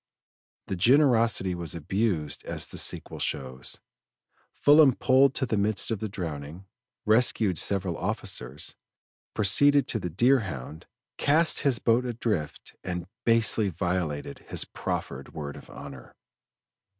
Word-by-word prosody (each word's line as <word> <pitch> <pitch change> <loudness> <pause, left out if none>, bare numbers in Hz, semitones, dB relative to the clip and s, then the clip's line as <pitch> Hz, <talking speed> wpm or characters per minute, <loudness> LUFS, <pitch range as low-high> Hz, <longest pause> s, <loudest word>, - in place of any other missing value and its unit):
The 95 - -4
generosity 115 -3 +3
was 85 -3 -4
abused 85 -2 -2
as - - -1
the - - -6
sequel - - -3
shows. 65 -1 -4 0.7
Fullam 145 -3 +5
pulled 135 +1 +3
to 130 - 0
the 110 - -1
midst 100 +2 +1
of 110 - -2
the 110 - -4
drowning, 80 -1 -7 0.4
rescued 110 -5 +3
several 95 -3 +1
officers, 65 +4 -4 0.6
proceeded 140 +8 +4
to 115 - 0
the 90 - -4
Deerhound, 90 - 0 0.3
cast 160 +3 +3
his 135 -4 +1
boat 115 +2 +2
adrift, 110 -10 -4
and 90 -2 -4 0.2
basely 115 -2 +3
violated 85 -5 -3
his - - -2
proffered - - -5
word 70 -2 -6
of - - -13
honor. 70 -3 -11
100 Hz, 125 wpm, -27 LUFS, 80-120 Hz, 0.7 s, Fullam